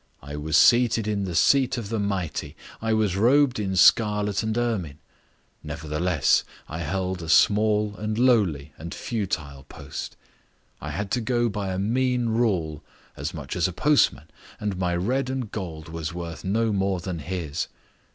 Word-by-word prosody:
I 70 +2 -7
was 75 +1 +1
seated 120 -3 +5
in 100 -2 -1
the 90 -3 -4
seat 130 +6 +3
of 110 -4 -5
the 115 -1 -1
mighty, 100 -5 -3 0.3
I 110 0 -1
was 110 -4 +1
robed 125 +4 +3
in 95 -2 -2
scarlet 105 +1 +4
and 110 0 -2
ermine; 105 -12 -1 0.6
nevertheless, 75 0 +1 0.2
I 80 - -6
held 90 +2 -2
a 80 - -6
small 105 +4 +4
and 105 0 -2
lowly 100 - +2
and 85 +4 -7
futile 80 - -4
post. - - -7 0.6
I 75 - -5
had 100 +7 -4
to 120 - +1
go 120 +1 +1
by 100 -2 -3
a 95 - -2
mean 120 +4 +1
rule 90 -10 0 0.3
as 75 +4 -4
much 75 -4 -6
as 90 -1 +2
a 90 - -5
postman, 150 - +2 0.3
and 105 -2 -2
my 90 -1 -1
red 125 +9 0
and 130 -5 -3
gold 85 -6 -6
was 80 0 -5
worth 85 -3 -6
no 110 +3 +1
more 95 -1 0
than 85 -1 -5
his. 80 -2 -3
100 Hz, 165 wpm, -25 LUFS, 85-110 Hz, 0.6 s, seated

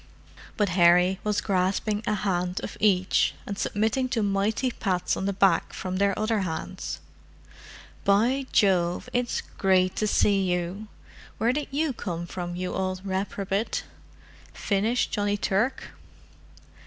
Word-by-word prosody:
But 205 -2 +2
Harry 180 +1 +4
was 210 -1 0
grasping 200 +2 0
a 210 - +2
hand 180 -3 -1
of - - -5
each, 190 -3 +2
and 200 - -4
submitting 220 +6 0
to 230 -4 0
mighty 205 +5 0
pats 185 -6 -1
on 190 - -2
the - - +1
back 195 0 +2
from 185 0 -4
their 200 0 +2
other 215 0 +1
hands. 165 -5 -4 1.0
"By 240 +7 +2
Jove, 180 -3 +2
it's 245 -1 0
great 185 -1 +1
to 215 - +1
see 200 -1 +3
you! 180 +4 -3 0.5
Where 230 +3 +2
did 295 +1 -2
you 290 +1 0
come 175 -6 -4
from, 175 0 -5
you 180 0 -3
old 185 0 -3
reprobate? 195 +2 -2 0.7
Finished 215 +5 0
Johnny 205 -1 0
Turk?" 205 +6 0
200 Hz, 135 wpm, -26 LUFS, 185-215 Hz, 1.0 s, Harry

